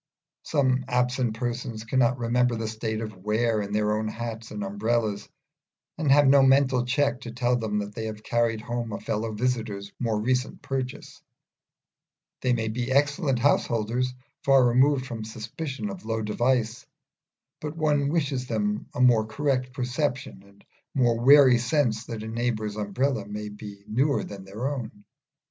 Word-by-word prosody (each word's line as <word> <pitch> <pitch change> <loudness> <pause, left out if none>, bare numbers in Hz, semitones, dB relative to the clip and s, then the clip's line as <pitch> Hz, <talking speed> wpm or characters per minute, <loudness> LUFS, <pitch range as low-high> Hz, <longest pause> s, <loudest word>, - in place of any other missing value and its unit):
Some 130 -4 +1
absent 125 -2 0
persons 120 -2 -4
cannot 125 +1 +2
remember 120 0 +1
the 110 -1 -3
state 110 0 -3
of 110 -3 -6
wear 110 +3 0
in 100 0 -5
their 105 0 +1
own 110 0 -2
hats 115 0 -5
and 105 -1 -5
umbrellas, 105 +1 -1 0.7
and 155 -3 +1
have 145 +1 +6
no 140 +1 +7
mental 135 -2 +4
check 135 +1 +1
to 120 - -7
tell 120 +1 +1
them 110 -3 -1
that 105 0 -3
they 110 +1 -4
have 110 -1 -6
carried 115 -2 0
home 120 -1 -4
a - - -4
fellow 110 +1 -2
visitor's 110 -3 -2
more 115 -3 0
recent 125 +3 -1
purchase: 130 -2 -5 1.2
they 125 - +1
may 115 -2 0
be 120 +3 -2
excellent 140 0 +2
householders, 120 -1 +1 0.3
far 135 -3 +5
removed 130 +2 +3
from 120 -4 -6
the 110 - -7
suspicion 130 - -5
of 190 -2 -9
low 110 0 -2
devices, 120 +1 0 0.7
but 150 +1 -6
one 145 -3 +2
wishes 140 -5 -1
them 105 -2 -1
a - - -1
more 115 -4 +5
correct 130 +1 -1
perception, 125 -3 -2
and 100 0 -22 0.3
a - - -3
more 120 -3 +3
wary 135 -2 +7
sense 120 -3 0
that 115 -3 -5
a - - -6
neighbour's 110 -2 -2
umbrella 105 +2 -1
may 105 0 -5
be 105 -1 -10
newer 135 +6 +1
than 100 -2 -9
their 105 +7 -4
own. 120 -7 -5
120 Hz, 165 wpm, -26 LUFS, 110-130 Hz, 1.2 s, no